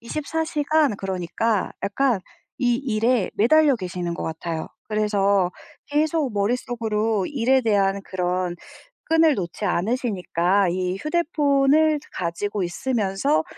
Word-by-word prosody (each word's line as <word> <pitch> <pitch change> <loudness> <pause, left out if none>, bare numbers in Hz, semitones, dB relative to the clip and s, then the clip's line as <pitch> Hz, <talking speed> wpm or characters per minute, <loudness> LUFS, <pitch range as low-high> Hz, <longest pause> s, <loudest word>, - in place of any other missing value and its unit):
24 305 +6 -3
시간 300 -6 +1
그러니까 195 +3 -1
약간 215 +1 +1 0.4
이 245 -1 +2
일에 235 -3 0
매달려 285 +5 +4
계시는 180 -3 -4
것 - - -5
같아요. 160 0 -4 0.2
그래서 200 -3 +2 0.4
계속 300 -3 0
머릿속으로 220 -1 -1
일에 265 -1 +2
대한 200 -3 +1
그런 180 -1 -2 0.5
끈을 325 -2 +4
놓지 180 +1 -4
않으시니까 195 -2 +1
이 185 +1 -1
휴대폰을 300 - +2
가지고 190 +4 -3
있으면서 215 - 0
215 Hz, 255 characters per minute, -23 LUFS, 190-275 Hz, 0.5 s, 매달려